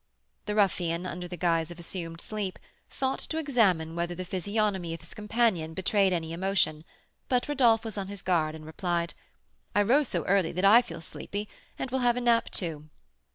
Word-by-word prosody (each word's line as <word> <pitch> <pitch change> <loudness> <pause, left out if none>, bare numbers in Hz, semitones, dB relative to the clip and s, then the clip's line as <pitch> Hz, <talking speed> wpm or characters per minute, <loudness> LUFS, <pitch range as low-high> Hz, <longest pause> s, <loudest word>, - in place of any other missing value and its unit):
The 210 - -1
ruffian, 175 -4 +1
under 180 0 -5
the 175 0 -7
guise 165 -2 +1
of 175 - -9
assumed 165 -1 -5
sleep, 205 -3 -3 0.3
thought 265 0 -1
to 320 - -3
examine 200 - +2
whether 170 +1 -2
the 185 +1 -5
physiognomy 190 -2 -1
of 165 - -12
his 165 - -12
companion 210 -7 0
betrayed 195 +1 +2
any 165 -2 -2
emotion; 170 -4 +1 0.4
but 250 -1 +2
Rodolph 240 -6 +3
was 215 -2 -4
on 195 - -4
his 200 -1 -7
guard, 160 -4 +1
and 155 -1 -10
replied: 170 +1 -2 0.6
"I 205 - +5
rose 270 +7 +4
so 170 -4 -1
early 190 -3 +2
that 185 +3 0
I 220 +5 +8
feel - - -8
sleepy, 205 +5 -6 0.3
and 260 - -4
will 265 - +1
have 245 -1 +3
a - - -1
nap, 235 -1 +3
too." 155 -4 -4
185 Hz, 190 wpm, -28 LUFS, 170-215 Hz, 0.6 s, I